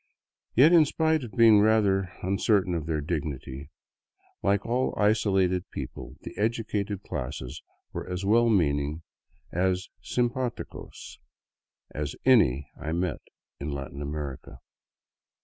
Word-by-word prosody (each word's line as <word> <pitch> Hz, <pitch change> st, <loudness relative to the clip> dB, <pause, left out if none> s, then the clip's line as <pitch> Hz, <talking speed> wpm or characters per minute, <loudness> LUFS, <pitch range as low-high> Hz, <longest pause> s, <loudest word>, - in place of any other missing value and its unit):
Yet 150 Hz, +8 st, +7 dB
in 165 Hz, -3 st, +7 dB
spite 160 Hz, 0 st, +1 dB
of 115 Hz, -, -8 dB
being 115 Hz, -3 st, +7 dB
rather 100 Hz, -3 st, +3 dB
uncertain 95 Hz, 0 st, +2 dB
of 80 Hz, -3 st, -3 dB
their 80 Hz, -2 st, -1 dB
dignity, 70 Hz, -3 st, -4 dB, 0.7 s
like 100 Hz, 0 st, +1 dB
all 125 Hz, +3 st, 0 dB
isolated 95 Hz, -4 st, +2 dB
peoples, -, -, -7 dB
the -, -, -9 dB
educated 105 Hz, -3 st, -1 dB
classes 60 Hz, 0 st, -5 dB, 0.3 s
were -, -, -5 dB
as 90 Hz, +1 st, -3 dB
well 115 Hz, +3 st, +4 dB
meaning, 75 Hz, -5 st, +1 dB, 0.5 s
as 95 Hz, +1 st, 0 dB
simpdticos, 120 Hz, -, -3 dB, 0.7 s
as 75 Hz, 0 st, -4 dB
any 70 Hz, -, +4 dB
I 80 Hz, +1 st, -4 dB
met 85 Hz, -1 st, -1 dB, 0.4 s
in 70 Hz, -, -4 dB
Latin 70 Hz, 0 st, -5 dB
America. 70 Hz, -2 st, -5 dB
95 Hz, 115 wpm, -27 LUFS, 75-110 Hz, 0.7 s, Yet